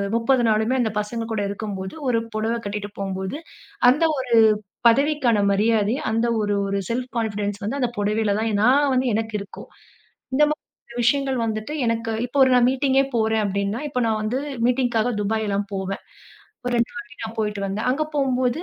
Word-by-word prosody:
30 240 +2 +2
நாளுமே 220 +4 +2
அந்த 220 -3 0
பசங்க 225 +2 -3
கூட 215 -2 -1
இருக்கும்போது, 200 -2 -5 0.2
ஒரு 230 -2 +2 0.2
புடவை 225 +2 0
கட்டிகிட்டு 205 0 -4
போம்போது 190 +5 -3 0.5
அந்த 290 +6 +3
ஒரு 250 -3 0 0.5
பதவிக்கான 270 -2 +3
மரியாதை 215 +2 +2 0.2
அந்த 230 +1 +1
ஒரு 205 0 0
ஒரு 200 - -1
செல்ஃப் 250 +1 -2
கான்ஃபிடென்ஸ் 205 -1 -2
வந்து, 260 +8 -2
அந்த 245 - +1
புடவையில 210 0 +1
தான் 225 0 0
நான் 275 +2 +4
வந்து 255 0 +1
எனக்கு 220 0 -2
இருக்கும். 200 - -11 0.7
இந்த 300 - +5
மாதிரி 305 - -4 0.4
விஷயங்கள் 270 +1 +2
வந்துட்டு 220 +5 -3
எனக்கு, 230 0 -1
இப்ப 250 +3 -5
ஒரு 260 - +4
நான் 245 0 +5
மீட்டிங்கே 270 0 +2
போறேன் 220 -1 +2
அப்டீன்னா, 200 +3 -1
இப்ப 250 -3 -2
நான் 220 -1 0
வந்து 240 +5 -1 0.3
மீட்டிங்குக்காக 245 -2 +1
துபாய்லாம் 205 -1 -1
போவேன். 195 0 -3 0.6
ஒரு 245 - -1
2 235 - +1
வாட்டி 240 - -5 0.3
போயிட்டு 210 -2 -2
வந்தேன். 200 +5 -2
அங்க 275 +5 +1
போகும்போது, 255 -1 +1
225 Hz, 165 wpm, -23 LUFS, 210-250 Hz, 0.7 s, இந்த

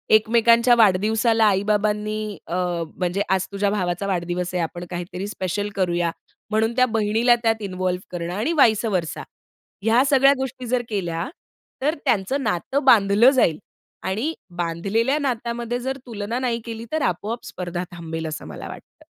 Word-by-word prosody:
एकमेकांच्या 235 +2 +5
वाढदिवसाला 220 +2 +3
आई-बाबांनी 210 +1 0
अ, 175 - -3 0.4
म्हणजे 180 +2 -1
आज 190 0 +2
तुझ्या 200 0 0
भावाचा 185 -1 -1
वाढदिवस 180 -1 -2
आहे, 180 -2 0
आपण 175 +2 -5
काहीतरी 180 +2 -5
स्पेशल 205 0 -3
करूया, 175 -3 +1 0.4
म्हणून 220 +2 +1
त्या 255 0 +5
बहिणीला 225 +3 +3
त्यात 225 -1 +1
इन्व्हॉल्व 185 -2 -2
करणं 175 0 -4
आणि 225 - -1
वाइसअव्हरसा 210 - +2 0.6
ह्या 230 +3 +4
सगळ्या 275 0 +6
गोष्टी 260 -1 -5
जर 250 +1 +1
केल्या, 175 -5 -2 0.5
तर 300 +4 +1
त्यांचं 260 +3 +1
नातं 265 +11 -1
बांधलं 215 -1 +6
जाईल 210 - +2 0.5
आणि 230 +12 -1 0.2
बांधलेल्या 195 - 0
नातामध्ये 240 -2 -2
जर 265 +2 -3
तुलना 225 0 -4
नाही 235 -3 -1
केली, 230 0 -6
तर 315 - 0
आपोआप 215 +4 -2
स्पर्धा 175 0 -4
थांबेल, 165 -1 -5
असं 155 0 -6
मला - - -8
वाटतं. - - -13
210 Hz, 145 wpm, -23 LUFS, 180-235 Hz, 0.6 s, सगळ्या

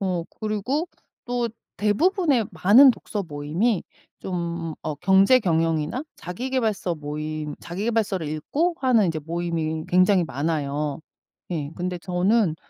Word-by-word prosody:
어 180 -4 -1 0.2
그리고 220 - -1 0.4
또 245 -2 -1 0.3
대부분의 280 - +2
많은 245 +9 +7
독서 210 -3 -4
모임이 165 +7 -1 0.4
좀 170 -3 -3
어 155 - -3
경제 195 - +5
경영이나 165 - 0
자기계발서 215 -1 -2
모임 150 0 -4
자기계발서를 195 -2 -1
읽고 285 - -1
하는 245 -6 +4
이제 160 -1 -1
모임이 160 0 -3
굉장히 185 0 +4
많아요. 145 0 -2 0.5
예 150 -4 -3
근데 180 0 -3
저는 180 +1 +1
180 Hz, 270 characters per minute, -24 LUFS, 160-220 Hz, 0.5 s, 많은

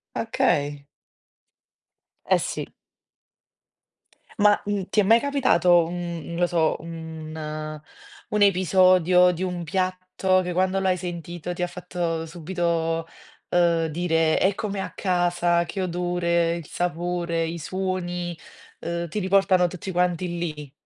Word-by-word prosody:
Okay. 145 0 0 1.4
Eh, - - +4
sì. - - -4 1.7
Ma, 205 0 +6
mhmm, 205 -2 -2
ti 210 - +3
è - - +1
mai 225 +4 +6
capitato 180 - +3
un 175 -1 -4
non 170 - -6
lo 175 0 +2
so, 165 -3 +1
un 155 -2 -7 0.5
un 210 -1 0
episodio 185 -1 +5
di 180 +2 -4
un 180 -2 -3
piatto 185 0 0
che 180 -1 -3
quando 185 +1 +1
l'hai 190 -1 +2
sentito 175 -1 -6
ti 180 - -6
ha 180 - +1
fatto 175 -2 -3
subito, 165 -1 -2 0.4
uhm, 170 -2 +3
dire: 165 0 +1
"È 190 +1 +2
come 205 -3 -3
a - - -5
casa." 175 -2 +1
Che 195 - -4
odore, 170 -1 0
il 170 -3 -7
sapore, 175 -1 -2
i 170 +1 -4
suoni, 175 0 -3 0.4
uhm, 170 0 -3
ti 210 - -3
riportano 190 -1 +3
tutti 185 +2 -6
quanti 180 0 0
lì? 150 -5 -5
175 Hz, 130 wpm, -24 LUFS, 165-185 Hz, 1.7 s, Ma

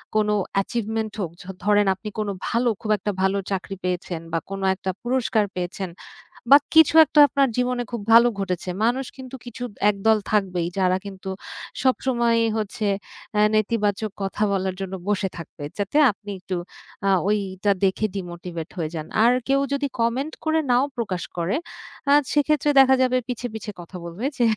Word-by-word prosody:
কোন 215 -1 +3 0.3
অ্যাচিভমেন্ট 220 +2 -1
হোক। 170 - -3
য - - -11 0.2
ধরেন 205 0 +4
আপনি 210 +3 -7
কোন 215 - -1 0.2
ভালো 240 +1 +1
খুব 215 - -2
একটা 205 +2 -2
ভালো 190 +1 +2
চাকরি 195 0 -3
পেয়েছেন 180 -2 -2
বা, 165 - +1
কোন 195 0 -5
একটা 190 0 -5
পুরস্কার 240 -3 +1
পেয়েছেন। 180 +1 -4 0.6
বা 280 - +11 0.2
কিছু 320 -1 +7
একটা 300 0 +3
আপনার 275 +1 +2
জীবনে 250 0 0
খুব 235 -3 -4
ভালো 235 +1 +8
ঘটেছে। 185 -2 -3 0.2
মানুষ 250 +4 +1
কিন্তু 260 -1 -9
কিছু 240 0 -8 0.3
একদল 215 +2 +2
থাকবেই 185 -5 +1
যারা 185 -1 +3
কিন্তু 195 -1 -8 0.5
সবসময়ই 235 -3 +2
হচ্ছে 215 0 -3 0.5
এ 210 - +5
নেতিবাচক 215 -1 +1
কথা 195 +2 -3
বলার 190 -1 -1
জন্য 190 0 -4
বসে 205 -1 +1
থাকবে। 165 -3 -10 0.2
যাতে 205 +7 -2
আপনি 205 0 -9
একটু 185 0 -5 0.5
আ - - +3 0.2
ওইটা 200 -1 0
দেখে 195 +3 +2
ডিমোটিভেট 175 -3 -6
হয়ে 160 -2 -2
যান। 155 -2 -4 0.2
আর 235 +2 +6 0.2
কেউ 275 0 +3
যদি 280 0 0
কমেন্ট 255 +7 0
করে 315 0 +2
নাও 245 +2 +4
প্রকাশ 205 -7 -2
করে, 175 +7 0 0.5
আ - - +6 0.2
সেক্ষেত্রে 295 0 +2
দেখা 265 0 +6
যাবে 255 0 +2
পিছে, 250 0 -3
পিছে 220 -1 -5
কথা 175 +2 -10
বলবে 170 +7 -6
যে 245 - 0
210 Hz, 165 wpm, -23 LUFS, 190-245 Hz, 0.6 s, বা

